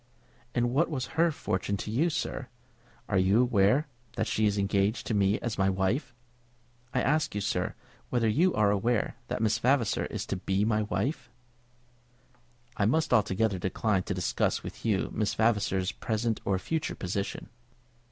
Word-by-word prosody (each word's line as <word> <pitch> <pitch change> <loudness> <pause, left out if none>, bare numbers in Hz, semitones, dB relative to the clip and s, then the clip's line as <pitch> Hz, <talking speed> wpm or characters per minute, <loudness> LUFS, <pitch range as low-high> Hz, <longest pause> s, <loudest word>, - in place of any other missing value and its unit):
"And 120 0 +1
what 150 +7 +2
was 130 -5 -3
her 170 +2 +3
fortune 100 -7 -2
to 105 - -5
you, 150 +10 +2
sir? 145 -4 -3 0.6
Are 100 -4 +2
you 95 +4 +4
aware 125 +3 +3 0.3
that 110 - 0
she 110 -1 +1
is 105 0 0
engaged 100 +2 +1
to - - -2
me 100 0 +3
as 115 -4 -3
my 95 0 +3
wife? 95 +7 -1 0.8
I 130 - 0
ask 150 -4 +1
you, 105 - -1
sir, - - -1 0.3
whether 120 -2 +1
you 165 +12 +3
are 105 -1 +3
aware 110 +3 0
that - - -2
Miss 110 -1 +2
Vavasor 125 -4 +2
is - - -4
to 95 - -3
be 95 +2 0
my 110 -1 +2
wife?" 120 +6 -2 1.5
"I 100 - +2
must 160 +4 +1
altogether 105 -2 +2
decline 95 +2 0
to 100 - -2
discuss 70 -10 0
with - - -9
you 105 -4 0
Miss 105 -1 0
Vavasor's 105 -4 +1
present 110 0 -2
or 100 -1 +1
future 155 +10 -2
position." 100 +2 -4
110 Hz, 165 wpm, -29 LUFS, 100-125 Hz, 1.5 s, you